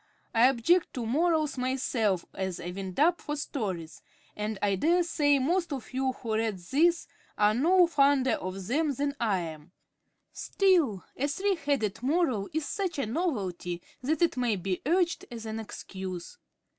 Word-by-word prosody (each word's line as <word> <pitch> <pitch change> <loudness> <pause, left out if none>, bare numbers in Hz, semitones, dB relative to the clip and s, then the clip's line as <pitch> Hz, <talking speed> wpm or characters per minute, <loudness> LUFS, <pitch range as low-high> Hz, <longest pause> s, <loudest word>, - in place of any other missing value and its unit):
I 230 +2 +6
object 295 +8 +2
to 245 -3 -3
morals 310 +2 +1
myself 245 -7 0
as 190 -2 -3
a 175 0 -5
wind 190 0 -6
up 335 +3 +4
for 295 - -3
stories, 190 - -4 0.3
and 210 0 -3
I 200 0 +1
dare 335 - +3
say 290 -4 +2
most 335 +6 0
of 265 -3 -6
you 260 0 0
who 230 -3 -5
read 220 -2 0
this 310 - +2 0.3
are 210 0 +4
no 350 +9 +5
fonder 280 -5 +3
of 185 0 -3
them 285 - 0
than 280 +2 -1
I 210 -6 +1
am; 160 +1 -8 0.6
still, 335 - +2
a 280 - 0
three 390 +8 0
headed 280 - -1
moral 260 - +1
is 315 -1 -2
such 380 -2 -2
a 275 - 0
novelty 205 - -2 0.2
that 305 +6 +1
it 335 - +2
may 245 -4 +1
be 185 0 -3
urged 345 +1 +1
as 230 -2 -7
an 220 0 -4
excuse. 190 - -7
255 Hz, 165 wpm, -29 LUFS, 200-315 Hz, 0.6 s, I